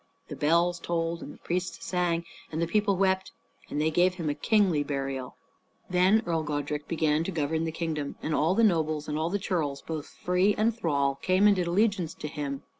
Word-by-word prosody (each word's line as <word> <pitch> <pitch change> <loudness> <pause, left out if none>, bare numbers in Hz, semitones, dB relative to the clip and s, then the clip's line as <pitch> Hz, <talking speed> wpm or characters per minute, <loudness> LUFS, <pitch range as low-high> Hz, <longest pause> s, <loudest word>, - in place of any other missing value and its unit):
The - - -5
bells 170 +3 +2
tolled 165 0 -2
and - - -7
the - - -13
priests 180 +1 -3
sang, 175 -2 0 0.3
and 160 - -3
the 170 - +2
people 200 +2 +1
wept; 190 0 +1 0.4
and 145 - -2
they 155 +1 +2
gave 180 +3 +3
him 165 -5 -2
a - - -1
kingly 180 -1 +2
burial. 135 -3 -4 0.6
Then 185 +5 +4
Earl 165 -2 0
Godrich 150 0 -3
began 155 -1 +1
to 195 - -3
govern 160 0 -1
the 160 - -2
kingdom; 155 -3 -3
and 155 - -3
all 160 +5 +2
the 230 - +3
nobles 155 -6 +2
and 150 - -2
all 160 +2 0
the 200 - 0
churls, 160 -9 -2
both 155 -3 -5
free 180 +3 +1
and 220 +1 +2
thrall, 140 -9 0
came 185 +2 +3
and 205 -1 +6
did 180 -2 -1
allegiance 190 -2 +1
to 150 - -6
him. 145 -2 -4
165 Hz, 205 wpm, -28 LUFS, 150-185 Hz, 0.6 s, and